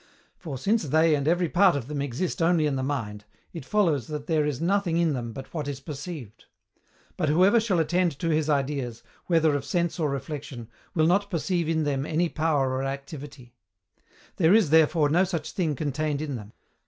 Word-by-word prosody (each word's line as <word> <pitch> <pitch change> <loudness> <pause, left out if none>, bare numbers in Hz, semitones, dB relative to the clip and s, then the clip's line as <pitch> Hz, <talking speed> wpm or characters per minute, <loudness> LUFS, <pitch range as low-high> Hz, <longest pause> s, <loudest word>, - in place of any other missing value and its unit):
For, 150 -6 -6
since 200 - +1
they 160 +3 +3
and 145 -1 0
every 175 +1 +2
part 185 0 +4
of 130 -4 -4
them 145 -1 -3
exist 140 +7 -3
only 165 -1 +3
in 145 -2 0
the 130 - -2
mind, 115 -7 -3 0.3
it 165 -5 -7
follows 160 - +1
that 150 -1 -5
there 155 -2 +1
is 140 -4 -2
nothing 180 -1 +1
in 170 -3 +2
them 120 -3 -4
but 135 +3 -10
what 155 -4 -3
is 140 -2 -4
perceived: 140 - -8 0.7
but 155 - 0
whoever 185 +9 +5
shall 215 -5 0
attend 170 -1 +1
to 165 +1 -2
his 155 -1 +1
ideas, 135 -5 -1 0.2
whether 160 -3 +3
of 140 - -2
sense 170 +5 -1
or 155 -3 +1
reflexion, 135 -4 -6 0.3
will 155 -2 +3
not 200 +4 +2
perceive 170 -2 -1
in 160 -1 +1
them 140 -1 -1
any 165 +2 +1
power 150 -5 0
or 130 0 -1
activity; 135 -2 -7 0.8
there 175 +3 +5
is, 205 -10 +3
therefore, 160 -1 +4
no 175 +5 +4
such 165 -5 -3
thing 160 -6 -1
contained 150 +1 -2
in 145 -3 -4
them. 105 -2 -9
155 Hz, 195 wpm, -26 LUFS, 140-170 Hz, 0.8 s, whoever